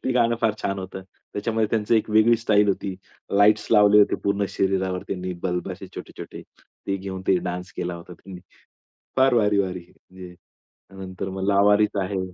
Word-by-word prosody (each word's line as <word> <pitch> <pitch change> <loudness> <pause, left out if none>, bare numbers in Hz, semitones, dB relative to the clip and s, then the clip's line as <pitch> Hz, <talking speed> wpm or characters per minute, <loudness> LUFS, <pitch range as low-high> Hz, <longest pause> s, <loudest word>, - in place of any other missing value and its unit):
ते 130 - 0
गाणं 115 -1 +2
फार 110 -2 +2
छान 100 0 -2
होतं. 95 0 -7 0.3
त्याच्यामध्ये 110 +1 0
त्यांची 110 0 +2
एक 110 - -1
वेगळी 110 +2 +5
स्टाईल 105 -2 +2
होती. 95 -1 -2 0.3
लाईट्स 105 +1 +4
लावले 105 -1 +6
होते 100 - +3
पूर्ण 100 0 +1
शरीरावर 95 -1 -1
त्यांनी 90 -1 -4
बल्ब 90 -1 -2
असे - - -9
छोटे-छोटे - - -9 0.4
ते 100 - 0
घेऊन 95 -1 -6
ते 95 - +5
डान्स 90 +1 -6
केला 90 0 -3
होता 85 +1 -11
त्यांनी. 90 0 -12 0.8
फार 130 -1 +4
भारी-भारी 100 -5 +1
म्हणजे 90 -1 -14 0.7
नंतर 95 +1 -6
मग 95 0 -4
लावारिस 105 +1 +3
आहे. 95 +1 -3
100 Hz, 165 wpm, -23 LUFS, 95-105 Hz, 0.8 s, लावले